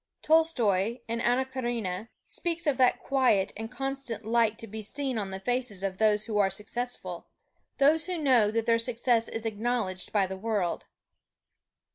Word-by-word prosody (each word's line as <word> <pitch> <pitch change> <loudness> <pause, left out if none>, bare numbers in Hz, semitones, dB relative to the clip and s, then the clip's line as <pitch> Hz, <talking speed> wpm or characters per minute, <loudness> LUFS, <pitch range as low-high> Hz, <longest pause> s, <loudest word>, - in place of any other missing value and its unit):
Tolstoy 240 - +3
in 230 0 -2
"Anna 250 +2 +2
Karenina" 235 -6 -3 0.2
speaks 340 -1 -3
of 290 -3 +2
that 255 -2 +3
quiet 255 -8 +2
and 225 +1 -6
constant 270 -4 -4
light 225 -1 +2
to 230 - -6
be 220 0 -7
seen 260 +2 -2
on 200 -2 -3
the 190 0 -5
faces 245 -3 -2
of 190 -1 -3
those 215 -1 +3
who 215 -3 -1
are 195 -1 +4
successful 240 +5 -4 0.5
those 310 +4 +4
who 365 -1 -2
know 255 -9 +4
that 225 +1 -1
their 230 -1 +3
success 235 -1 +1
is 225 0 -4
acknowledged 220 -4 -2
by 200 -2 +3
the 190 0 -6
world. 200 -4 -1
230 Hz, 165 wpm, -28 LUFS, 210-255 Hz, 0.5 s, are